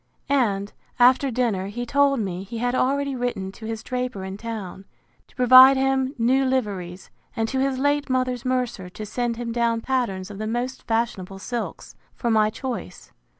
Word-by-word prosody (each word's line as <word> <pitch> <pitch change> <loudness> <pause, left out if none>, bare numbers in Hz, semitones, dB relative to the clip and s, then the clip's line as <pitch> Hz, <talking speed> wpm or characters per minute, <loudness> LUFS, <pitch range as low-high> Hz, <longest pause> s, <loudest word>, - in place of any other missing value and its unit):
And, 205 -8 +1 0.2
after 255 +3 +5
dinner, 225 -6 0
he 240 +4 -5
told 280 +1 +3
me, 185 -4 -3
he 200 +4 -7
had 245 +2 0
already 275 +2 0
written 240 -6 -3
to 220 +2 -10
his 225 -1 -5
draper, 250 -6 -3
in 190 0 -6
town, 205 -3 -7 0.4
to - - -26
provide 255 +1 +8
him 265 +1 +1
new 255 +3 +3
liveries; 200 -9 -2 0.2
and 225 -1 0
to 265 - -1
his 270 0 0
late 285 +1 +1
mother's 255 -1 0
mercer, 250 -7 -2
to 215 +4 -8
send 240 +2 -2
him 235 -1 -4
down 230 -1 0
patterns 210 -7 -2
of 200 - -9
the 215 - -3
most 245 +3 -3
fashionable 215 -5 -1
silks, 235 +4 -5 0.2
for 235 - -1
my 215 -1 +4
choice. 255 +3 -6
240 Hz, 175 wpm, -24 LUFS, 210-255 Hz, 0.4 s, provide